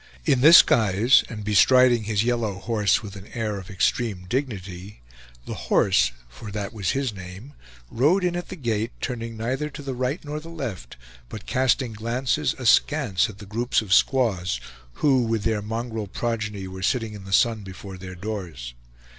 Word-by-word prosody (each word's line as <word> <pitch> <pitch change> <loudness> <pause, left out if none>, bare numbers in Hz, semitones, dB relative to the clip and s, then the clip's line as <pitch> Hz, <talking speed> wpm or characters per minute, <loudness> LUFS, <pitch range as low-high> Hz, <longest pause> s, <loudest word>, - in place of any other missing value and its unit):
In 125 - +3
this 160 +5 +10
guise, 110 +3 +4
and 105 -3 -7
bestriding 120 +2 +5
his 105 -1 +1
yellow 115 -4 0
horse 105 +2 +1
with 100 -1 -8
an 100 0 -11
air 110 -3 -2
of 95 - -11
extreme 100 0 -1
dignity, 100 - -4 0.5
The - - -5 0.2
Horse, 65 +1 +3 0.2
for 60 - -11
that 100 0 -5
was 100 -4 -2
his 135 -5 -1
name, 95 +8 -10 0.4
rode 155 +11 +2
in 175 -1 0
at 175 - -5
the - - -6
gate, 115 - -2
turning 115 -3 -5
neither 130 +7 -2
to 145 0 -9
the 135 -1 -4
right 130 +6 -3
nor 150 +1 -4
the 165 +2 -11
left, 125 - -6 0.3
but 105 - -8
casting 130 -2 +1
glances 120 +7 -1
askance 125 - +2
at 100 - -11
the 105 - -11
groups 115 +5 0
of 100 -2 -1
squaws 100 - +2 0.5
who, 135 -3 +4
with 115 -3 -1
their 110 -2 0
mongrel 115 0 -4
progeny, 105 -2 -3
were 95 0 -8
sitting 115 +2 0
in 100 -2 -10
the 95 - -9
sun 110 +2 +3
before 95 0 -10
their 95 0 -8
doors. 90 - -6
110 Hz, 175 wpm, -24 LUFS, 100-125 Hz, 0.5 s, this